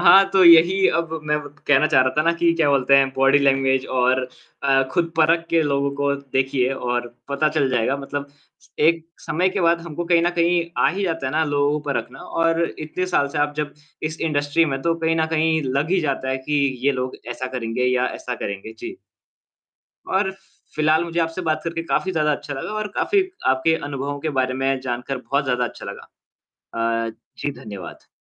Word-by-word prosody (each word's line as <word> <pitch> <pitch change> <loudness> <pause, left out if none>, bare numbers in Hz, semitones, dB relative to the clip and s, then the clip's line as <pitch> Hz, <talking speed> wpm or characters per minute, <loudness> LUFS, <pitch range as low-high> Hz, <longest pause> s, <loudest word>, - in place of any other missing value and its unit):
हाँ 195 +2 +7
तो 190 -1 +5
यही 175 +3 +7
अब 170 -1 -1
मैं 150 0 0
व 145 - -8 0.2
कहना 145 +1 +5
चाह 145 -4 +4
रहा 130 - +1
था - - +5
ना 165 +1 +3
कि 170 0 +2
क्या 160 -3 +2
बोलते 140 0 +4
हैं, 135 -1 +4
बॉडी 135 +1 +4
लैंग्वेज 135 -1 +2
और 130 0 +1 0.4
अ, 135 -1 +3
खुद 170 -2 0
परख 165 +1 +3
के 165 -1 +3
लोगों 140 -1 0
को 140 0 +1
देखिए 130 -1 0
और 120 -1 -2 0.2
पता 140 +2 +1
चल 150 -3 +1
जाएगा। 125 +2 +1
मतलब 140 +1 -5 0.5
एक 165 +1 +3 0.2
समय 180 +5 0
के 190 - -2
बाद 170 -1 +3
हमको 170 0 -5
कहीं 170 -1 +3
न 175 - +2
कहीं 170 0 +3 0.2
आ - - +6
ही 195 +3 -3
जाता 165 -6 -2
है 130 - -3
ना 160 +1 +2
लोगों 145 -1 +1
को 150 - -1
परखना, 125 +1 -4
और 165 0 0 0.2
इतने 160 +4 -3
साल 145 -6 +1
से 145 - -4
आप 145 0 0
जब 150 -1 -3 0.3
इस 155 +1 -4
इंडस्ट्री 150 0 +1
में 150 - -2
हैं, 135 - -8
तो 165 0 +1
कहीं 165 0 +1
न 160 -1 +1
कहीं 160 -1 +2
लग 140 +5 -1
ही 190 - +3
जाता 140 -4 -2
है 130 - 0
कि 150 - -1 0.3
ये 140 - +4
लोग 130 -1 -4
ऐसा 130 +2 -4
करेंगे 115 +1 -2
या 125 0 +2
ऐसा 125 - -5
करेंगे, 100 0 -6
जी। 355 +1 -7 1.1
और 190 0 +1
फि 190 - -18 0.4
फिलहाल, 155 +2 +3
मुझे 170 0 -3
आपसे 165 +2 -1
बात 155 -2 -1
करके 165 0 -3
काफ़ी 190 +3 -1
ज़्यादा 150 -3 +1
अच्छा 145 0 -4
लगा 135 +8 -5
और 215 0 -2
काफ़ी 395 -2 +2 0.2
आपके 130 +5 +3
अनुभवों 145 0 -4
के 155 - -2
बारे 130 0 0
में 135 +1 0
जानकर 125 +1 -3
बहुत 140 +3 -1
ज़्यादा 125 -2 0
अच्छा - - -8
लगा। - - -8 1.0
अ, - - -5 0.3
जी, 145 - -2
धन्यवाद। 100 -4 -9
145 Hz, 210 wpm, -22 LUFS, 135-165 Hz, 1.1 s, हाँ